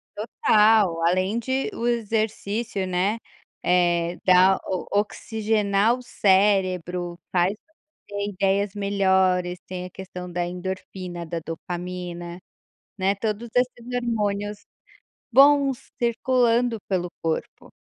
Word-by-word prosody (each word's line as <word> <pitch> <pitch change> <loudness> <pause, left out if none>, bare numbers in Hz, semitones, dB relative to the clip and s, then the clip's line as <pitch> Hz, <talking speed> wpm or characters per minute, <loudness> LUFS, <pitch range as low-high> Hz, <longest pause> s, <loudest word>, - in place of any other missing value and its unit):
Total, 210 -4 +3
além 185 +5 +1
de 260 - -1
o 235 - -2
exercício, 220 -2 -1
né. 190 +5 0 0.4
Eh, 175 -1 +2
dá 185 +1 +6
o 185 -2 -3
oxigenar 215 +1 +1
o 250 - -10
cérebro, 185 -5 +1
faz 180 +2 +2 0.5
ter 205 0 -3
ideias 195 +1 0
melhores, 190 -3 +1
tem 180 -1 -5
a - - -8
questão 180 -1 -8
da 175 0 -1
endorfina, 180 -1 -6
da 165 +1 -4
dopamina. 175 0 -6 0.6
Né, 190 +1 +2
todos 215 +3 -3
esses 245 -1 0 0.2
hormônios 205 -3 -2 0.7
bons 275 0 +5
circulando 240 -1 +2
pelo 180 -2 -1
corpo. 160 -1 -3
195 Hz, 105 wpm, -24 LUFS, 180-220 Hz, 0.7 s, dá